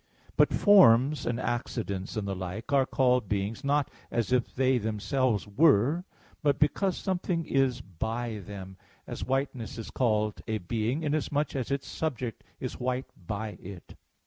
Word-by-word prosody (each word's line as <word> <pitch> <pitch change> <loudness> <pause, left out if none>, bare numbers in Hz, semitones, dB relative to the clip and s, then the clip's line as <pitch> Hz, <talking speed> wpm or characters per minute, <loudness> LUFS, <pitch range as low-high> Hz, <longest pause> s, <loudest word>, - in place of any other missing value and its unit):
But - - +4
forms 150 - +6
and 120 0 -1
accidents 115 -6 -3
and 105 -2 -2
the 100 - -1
like 95 +8 -5
are 135 -2 +4
called 125 -5 +2
beings, 105 +5 -2
not 140 0 +1 0.2
as 115 0 -1
if 125 -1 +1
they 130 -1 +3
themselves 110 +2 0
were, 145 - +3 0.4
but 145 -3 +2
because 175 +6 +1
something 180 -3 -1
is 135 -4 +1
by 110 +4 -4
them; 95 -1 -9 0.3
as - - -6
whiteness 130 -3 -2
is 115 - -7
called 110 -4 0
a 110 -1 0
being, 115 - -2
inasmuch 150 -1 0
as 130 -3 -2
its 140 -1 -1
subject 130 -7 -3 0.2
is 130 - -5
white 125 +1 -2 0.2
by 105 0 -4
it. 90 -2 -10
125 Hz, 150 wpm, -29 LUFS, 105-140 Hz, 0.4 s, forms